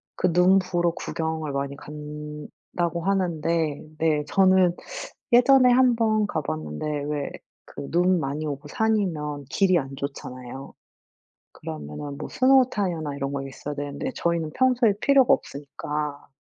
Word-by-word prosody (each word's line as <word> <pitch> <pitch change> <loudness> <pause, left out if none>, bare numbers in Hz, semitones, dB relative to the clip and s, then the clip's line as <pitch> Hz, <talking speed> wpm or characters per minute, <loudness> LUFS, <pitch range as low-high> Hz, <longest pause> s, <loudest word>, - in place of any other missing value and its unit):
그 180 -1 +1
눈 180 +3 +5
보러 175 -2 0
구경을 160 -2 -3
많이 140 0 -3
간다고 150 +3 -6
하는데 165 -5 0 0.2
네 155 -1 +1
저는 185 0 +4 0.7
예전에 260 -2 +7
1 250 -1 +5
번 215 -2 +2
가봤는데 80 - -4 0.2
왜 145 -1 -3 0.3
그 140 - -8
눈 180 +1 +3
많이 145 +1 -3
오고 145 -1 -5
산이면 160 -8 -1
길이 185 +1 +3
안 135 0 -6
좋잖아요. 135 -1 -7 0.8
그러면은 80 - -7
뭐 - - -6
스노우 260 0 +4
타이어나 165 - -2
이런 140 0 -3
거 140 - -2
있어야 140 +2 -7
되는데 145 - -4
저희는 170 -2 -1
평소에 250 -4 +3
필요가 275 -2 +5
없으니까 145 +1 -4
155 Hz, 280 characters per minute, -25 LUFS, 145-190 Hz, 0.8 s, 예전에